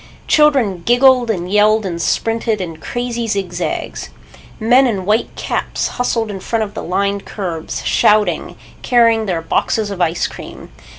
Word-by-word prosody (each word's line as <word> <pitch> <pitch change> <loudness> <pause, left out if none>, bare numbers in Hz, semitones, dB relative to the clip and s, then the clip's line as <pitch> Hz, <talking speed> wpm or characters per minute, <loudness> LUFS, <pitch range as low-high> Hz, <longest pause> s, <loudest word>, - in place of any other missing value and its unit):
Children 265 - +3
giggled 245 +1 +4
and 180 -4 -2
yelled 210 +1 +3
and 170 -2 -3
sprinted 225 +1 0
in 165 -4 -5
crazy 240 +5 -4
zig 195 -4 -2
zags. 175 - -4 0.5
Men 250 +4 +4
in 195 -6 -2
white 215 +4 0
caps - - -2
hustled 230 -3 -1
in 195 - -6
front 225 +3 -1
of 205 -1 -7
the - - -5
lined 200 +2 -1
curbs, 170 -6 -5
shouting, 210 0 +2 0.3
carrying 230 -3 +3
their 170 -3 -2
boxes 210 +5 0
of 190 -2 -5
ice 170 0 +1
cream. - - -9
215 Hz, 155 wpm, -17 LUFS, 185-235 Hz, 0.5 s, giggled